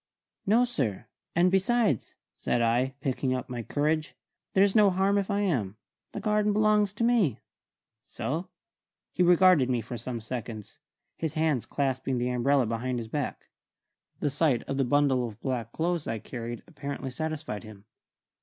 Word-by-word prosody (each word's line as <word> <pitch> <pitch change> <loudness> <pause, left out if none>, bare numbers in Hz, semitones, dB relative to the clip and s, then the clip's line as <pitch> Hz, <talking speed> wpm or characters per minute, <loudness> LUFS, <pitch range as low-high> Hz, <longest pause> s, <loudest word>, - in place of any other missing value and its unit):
"No, 230 +5 +5
sir; 130 - -2 0.3
and 175 +2 +4
besides," 195 - +1 0.2
said 120 - 0
I, 120 +3 +1
picking 130 -1 0
up 130 +1 -5
my 120 -1 -4
courage, 155 +5 -1 0.4
"there's 195 0 +5
no 210 -2 +7
harm 195 +2 +2
if 195 - -3
I 200 0 +1
am. 115 - -1 0.4
The - - -4
garden 210 -1 +1
belongs 210 -1 +3
to 210 - -2
me." 225 - +3 0.7
"So?" 165 +7 -3 0.6
He - - -2
regarded 180 -6 +5
me 125 -2 +1
for 120 +1 -6
some 120 +1 -4
seconds, 110 -2 -7 0.4
his 160 -3 -3
hands 155 -6 +1
clasping 130 -2 -1
the 125 +1 0
umbrella 130 +2 +2
behind 120 +3 -2
his 115 -2 -5
back. 145 +2 -4 0.7
The 145 - +1
sight 140 -4 +2
of 135 - -4
the 135 - +2
bundle 130 -2 +2
of 110 -1 -11
black 120 -4 -3
clothes 170 +1 -1
I 115 - -1
carried 120 +1 -6
apparently 140 -4 -6
satisfied 155 -7 -4
him. 105 -2 -12
140 Hz, 160 wpm, -28 LUFS, 120-180 Hz, 0.7 s, no